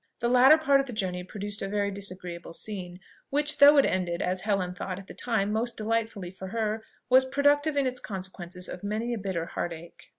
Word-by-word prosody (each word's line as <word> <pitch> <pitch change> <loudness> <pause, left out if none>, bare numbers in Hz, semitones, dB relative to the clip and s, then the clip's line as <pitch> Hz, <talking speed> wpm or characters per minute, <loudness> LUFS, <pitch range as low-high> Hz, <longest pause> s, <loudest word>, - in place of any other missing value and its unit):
The 235 - 0
latter 255 +5 +7
part 280 -3 +3
of 275 - -1
the 250 - -6
journey 185 -4 -2
produced 205 +2 -3
a 195 - -2
very 200 0 -1
disagreeable 185 -4 -5
scene, 180 -3 -4 0.3
which, 295 +1 +1
though 290 +1 +9
it 275 - +6
ended, 175 -2 -1
as 185 0 -1
Helen 195 -3 -1
thought 180 0 -5
at 195 - -10
the - - -11
time 215 -4 0
most 235 +3 -1
delightfully 220 -4 -2
for 190 0 -8
her, 220 +1 -2 0.2
was 260 +1 +6
productive 285 +3 +2
in 280 - +2
its 255 0 -1
consequences 185 -3 -5
of 180 - -8
many 220 +4 -2
a 230 - -3
bitter 190 -4 -3
heart 170 0 -4
ache. 165 +1 -13
205 Hz, 210 wpm, -27 LUFS, 185-245 Hz, 0.3 s, though